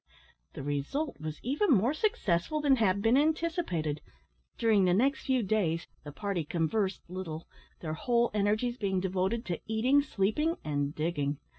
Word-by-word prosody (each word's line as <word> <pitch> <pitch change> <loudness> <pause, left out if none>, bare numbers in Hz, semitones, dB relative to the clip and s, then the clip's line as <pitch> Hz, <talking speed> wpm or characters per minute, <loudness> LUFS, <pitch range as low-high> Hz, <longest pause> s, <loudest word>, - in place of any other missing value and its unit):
The 135 - -7
result 145 - -2
was 155 -1 -5
even 290 - +1
more 245 +1 +4
successful 310 - 0
than 285 -3 +4
had 200 -3 +2
been 225 +2 +4
anticipated. 300 - 0 0.6
During 215 -4 +3
the 180 0 +3
next 265 +6 +1
few 260 -3 +2
days 185 -5 0 0.2
the 145 - -8
party 195 +1 -2
conversed 185 +5 -1
little; 170 -3 -6 0.3
their 155 -2 -3
whole 235 +7 +1
energies 215 +4 +1
being 195 -4 0
devoted 190 +5 -1
to 175 -2 -3
eating, 245 +6 +3
sleeping, 280 - 0
and 145 -1 -2
digging. 150 -3 -1
200 Hz, 150 wpm, -30 LUFS, 165-255 Hz, 0.6 s, more